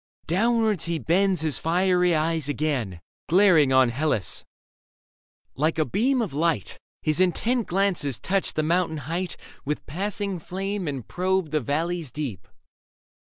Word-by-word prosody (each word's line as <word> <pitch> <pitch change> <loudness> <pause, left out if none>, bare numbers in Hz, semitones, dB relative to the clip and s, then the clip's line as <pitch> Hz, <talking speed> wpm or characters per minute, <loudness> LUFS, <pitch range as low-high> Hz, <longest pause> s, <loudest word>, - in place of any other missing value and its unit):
Downwards 220 +2 +1
he 170 -1 -1
bends 185 +2 +2
his 155 -3 0
fiery 180 +1 +2
eyes 160 -1 0
again. 130 - -2 0.3
Glaring 170 -6 +5
on 130 -1 +5
Hellas. 120 - -1 1.1
Like 155 +4 0
a 155 - +2
beam 245 - +1
of 195 - -5
light. 155 - -1 0.2
His 155 +2 +1
intent 220 +6 +1
glances 180 - 0
touch 190 - -1
the 155 - +1
mountain 165 0 +1
height 175 +4 -3 0.3
With 150 +2 -3
passing 195 +4 -3
flame 195 +2 -4
and 135 -5 -4
probe 185 -2 0
the 155 - +2
valleys 160 +3 -2
deep. 130 - -5
165 Hz, 135 wpm, -25 LUFS, 150-190 Hz, 1.1 s, Glaring